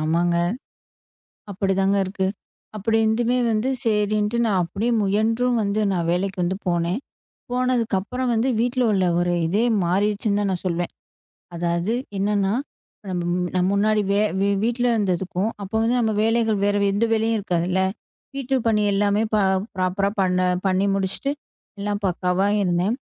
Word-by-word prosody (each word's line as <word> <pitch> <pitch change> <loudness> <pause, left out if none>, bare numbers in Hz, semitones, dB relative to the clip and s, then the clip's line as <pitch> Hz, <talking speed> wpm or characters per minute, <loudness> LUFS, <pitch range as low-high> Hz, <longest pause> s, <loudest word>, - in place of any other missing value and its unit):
ஆமாங்க. 170 +2 +1 1.2
அப்படித்தாங்க 195 0 +1
இருக்கு. 190 0 -2 0.5
அப்படி 220 +2 0
இருந்துமே 235 +3 +1
வந்து 220 +5 0
சரின்னு 210 0 +1
நான் 195 -4 +2
அப்படியே 205 +8 -2
முயன்றும் 225 +5 +1
வந்து 200 +2 -1
நான் 170 -3 -1
வேலைக்கு 190 +2 -1
வந்து 185 +2 -1
போனேன். 175 +5 0 0.5
போனதுக்கு 250 -4 +1
அப்புறம் 250 +5 -3
வந்து 230 +4 +1
வீட்ல 245 +1 +1
உள்ள 190 -2 +2
ஒரு 175 0 +1
இதே 205 +7 +1 0.2
மாறிடுச்சுன்னு 205 +3 +1
தான் 200 - 0
நான் 180 - -4
சொல்லுவேன். 175 0 -2 0.6
அதாவது 170 +5 -1 0.2
என்னன்னா 200 0 +1 0.6
நம்ம 180 -1 -2
முன்னாடி 180 0 -2
நம்ம 180 0 +2
முன்னாடி 210 +1 +2
வே 200 - +2 0.4
வீட்ல 240 +1 0
இருந்ததுக்கும் 190 0 -1
அப்ப 195 - -9
வந்து 235 +2 +2
நம்ம 225 -2 +1
வேலைகள் 225 -1 +2
வேற 205 0 +2
எந்த 210 +4 +1
வேலையும் 225 +1 +1
இருக்காது 175 -4 -1
இல்ல, 190 +1 +1 0.5
வீட்டுப் 265 -2 -1
பணி 215 -2 +3
எல்லாமே 205 +1 +2
ப்ராப்பர்ரா 195 -1 +1
பண்ண 180 -1 +1 0.3
பண்ணி 190 +1 +2
முடிச்சிட்டு 195 +8 -1 0.5
எல்லாம் 205 0 -2
பக்காவா 185 +1 +1
இருந்தேன். 180 +4 +1
200 Hz, 140 wpm, -22 LUFS, 185-225 Hz, 1.2 s, பணி